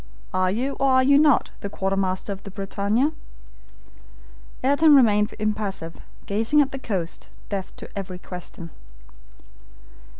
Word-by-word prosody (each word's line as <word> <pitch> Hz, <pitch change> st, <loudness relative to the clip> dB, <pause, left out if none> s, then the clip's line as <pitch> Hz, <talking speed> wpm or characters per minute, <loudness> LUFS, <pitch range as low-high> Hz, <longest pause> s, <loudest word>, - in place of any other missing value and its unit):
Are 185 Hz, 0 st, +2 dB
you, 255 Hz, +8 st, -1 dB
or 275 Hz, -, +3 dB
are 260 Hz, 0 st, +5 dB
you 280 Hz, +2 st, +5 dB
not, 295 Hz, -2 st, +4 dB
the 200 Hz, -, -5 dB
quartermaster 195 Hz, 0 st, -1 dB
of 195 Hz, -, -11 dB
the 200 Hz, -, -9 dB
BRITANNIA?" 200 Hz, +7 st, 0 dB, 1.5 s
Ayrton 285 Hz, +3 st, +5 dB
remained 210 Hz, -5 st, +4 dB
impassive, 210 Hz, -6 st, -3 dB, 0.3 s
gazing 225 Hz, +8 st, +2 dB
at 280 Hz, -2 st, +3 dB
the 270 Hz, -, -5 dB
coast, 185 Hz, -9 st, -4 dB, 0.2 s
deaf 195 Hz, -2 st, -4 dB
to -, -, -9 dB
every 190 Hz, -2 st, -5 dB
question. 180 Hz, -2 st, -9 dB
205 Hz, 130 wpm, -24 LUFS, 190-260 Hz, 1.5 s, are